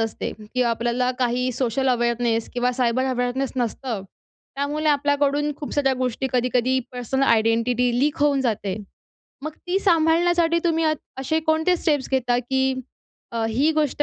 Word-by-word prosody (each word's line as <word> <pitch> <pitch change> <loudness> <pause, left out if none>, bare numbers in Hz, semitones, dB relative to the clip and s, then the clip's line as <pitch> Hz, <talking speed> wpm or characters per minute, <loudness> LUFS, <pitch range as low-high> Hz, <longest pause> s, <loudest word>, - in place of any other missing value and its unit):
असते 225 0 -2
किंवा 240 +3 -1
आपल्याला 240 +2 0
काही 250 0 0
सोशल 255 +1 0
अवेअरनेस 235 -2 0
किंवा 250 0 +1
सायबर 250 0 +1
अवेअरनेस 250 +2 -1
नसतं. 240 -2 -2 0.5
त्यामुळे 290 +3 -2
आपल्याकडून 285 0 +1
खूप 290 - -7
साऱ्या 275 -2 +2
गोष्टी 255 +1 -1
कधी-कधी 250 +1 +1
पर्सनल 250 +2 -2
आयडेंटिटी 230 +1 +2
लीक 290 +3 +1
होऊन 285 -2 +3
जाते. 215 -6 -1 0.7
मग 310 - -4
ती 360 +2 +1
सांभाळण्यासाठी 335 -1 +3
तुम्ही 330 -1 +2
अ 310 - +3 0.3
असे 315 +4 0
कोणते 320 +3 +2
स्टेप्स 295 -5 0
घेता? 245 -2 +2
की 265 +2 0 0.6
अ, 230 -1 -1
ही 270 +8 +2
गोष्ट 300 -2 0
260 Hz, 145 wpm, -23 LUFS, 240-295 Hz, 0.7 s, होऊन